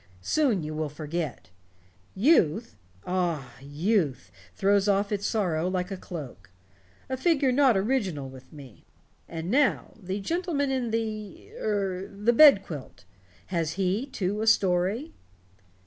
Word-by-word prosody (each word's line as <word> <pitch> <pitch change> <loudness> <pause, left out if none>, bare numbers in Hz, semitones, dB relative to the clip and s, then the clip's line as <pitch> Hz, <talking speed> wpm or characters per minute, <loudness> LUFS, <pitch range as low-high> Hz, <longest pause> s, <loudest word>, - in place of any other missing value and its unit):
Soon 245 - +1
you 155 +1 -5
will 155 -1 -2
forget. 150 - -5 0.6
Youth 220 - +3 0.3
ah, 170 -9 -2
youth 145 - -1 0.2
throws 200 +1 +2
off 200 +1 +2
its 205 -1 -1
sorrow 180 -6 0
like 185 0 -2
a - - -2
cloak. 140 - -9 0.6
A 260 - -2
figure 280 -2 +2
not 255 -4 +4
original 190 - -1
with 130 0 -13
me. 140 -7 -13 0.5
And 165 +2 -4
now 275 +1 +2
the 190 +2 -3
gentleman 315 - -1
in 255 -3 -1
the 215 -2 -4
er 195 -3 -2
the 210 +4 0
bed 275 -6 +8
quilt. 130 - -9 0.5
Has 165 -2 0
he, 195 +7 -1
too, 205 -4 -2
a 220 - -2
story?" 200 - +2
195 Hz, 130 wpm, -27 LUFS, 160-230 Hz, 0.6 s, bed